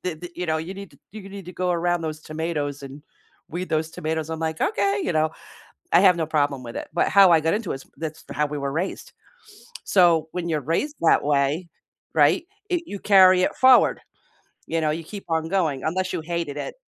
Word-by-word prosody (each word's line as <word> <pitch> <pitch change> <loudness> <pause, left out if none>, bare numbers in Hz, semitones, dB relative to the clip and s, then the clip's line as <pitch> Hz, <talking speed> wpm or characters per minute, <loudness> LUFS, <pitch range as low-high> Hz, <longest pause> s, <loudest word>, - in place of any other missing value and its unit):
The 180 -3 -2
the 175 +3 -9
you 180 - -3
know, 160 -1 +1
you 165 +4 -6
need 200 -3 -9
to 140 - -21
you 205 -2 -9
need 195 -1 -9
to 180 - -8
go 180 0 -1
around 175 0 0
those 155 -1 -4
tomatoes 155 -3 -4
and 135 +2 -10 0.5
weed 180 +3 -5
those 160 0 0
tomatoes." 160 0 -3
I'm 160 - -4
like, 160 -1 -3
"Okay," 200 0 +1
you - - -1
know? 155 0 +2 0.6
I 170 - +7
have 185 -3 +5
no 160 - 0
problem 145 -3 0
with 115 -1 -9
it. - - -6
But 170 - +2
how 195 -2 +7
I 165 - +6
got 160 +4 +1
into 210 -4 -3
it - - -3
is 135 - -11
that's 160 0 -6
how 150 0 0
we 150 0 -5
were 140 0 -2
raised. 175 +5 -4 0.7
So, 170 -4 +4
when 175 -1 -3
you're 155 -2 0
raised 290 - -1
that 165 - +4
way, 145 +4 0 0.5
right, 335 - +4 0.3
i 350 -1 +1
you 205 -9 -7
carry 185 -2 +6
it - - 0
forward, 260 -1 +5 0.7
you 165 0 -1
know, 155 - +1
you 165 +2 -4
keep 200 +5 -9
on 160 0 0
going 160 -8 0
unless 185 +3 -1
you - - -1
hated 165 -3 -4
it, 145 - -5
165 Hz, 225 wpm, -23 LUFS, 155-185 Hz, 0.7 s, I